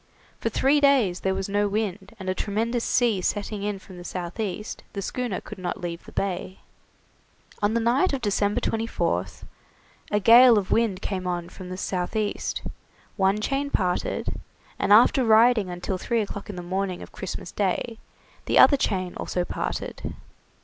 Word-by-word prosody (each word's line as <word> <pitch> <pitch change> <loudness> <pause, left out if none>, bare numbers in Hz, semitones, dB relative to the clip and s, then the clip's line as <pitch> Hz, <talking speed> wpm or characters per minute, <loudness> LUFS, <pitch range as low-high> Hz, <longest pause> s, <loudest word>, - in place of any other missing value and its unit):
For - - -1
three 285 +2 +3
days 255 -11 +4
there 190 0 0
was 195 0 -3
no 205 +1 +1
wind, 200 -2 -3
and 190 - -7
a 185 - +1
tremendous 225 +5 -1
sea 230 -6 +2
setting 205 +2 -2
in 205 0 -2
from 190 -1 -13
the 175 - -9
south 175 +2 -6
east, 210 0 -4
the 200 - -3
schooner 245 -3 -2
could 215 - -10
not 180 -1 -3
leave 170 -1 -5
the - - -12
bay. 190 -1 -3 1.0
On 210 +2 +2
the - - +3
night 245 +10 +2
of 275 - -1
December 205 -2 +1
24th 170 - -2 0.7
a 210 - +2
gale 235 +2 +8
of 195 -2 -1
wind 220 -5 +1
came 185 -2 -3
on 175 -1 -3
from 180 0 -10
the 185 - -5
south 180 +1 -3
east; 215 -1 -2 0.5
one 195 +1 +2
chain 275 +4 -1
parted, 180 -8 -1 0.4
and - - 0
after 240 +5 +6
riding 225 -2 +5
until 180 +1 -3
three 230 +4 0
o'clock 200 -1 -6
in 205 - -5
the 180 - -6
morning 185 0 -2
of - - -12
Christmas 180 -2 -6
Day, 210 +4 -1 0.5
the - - +1
other 280 - +8
chain 185 -7 -1
also 180 -1 -2
parted. - - -4
200 Hz, 175 wpm, -25 LUFS, 185-225 Hz, 1.0 s, gale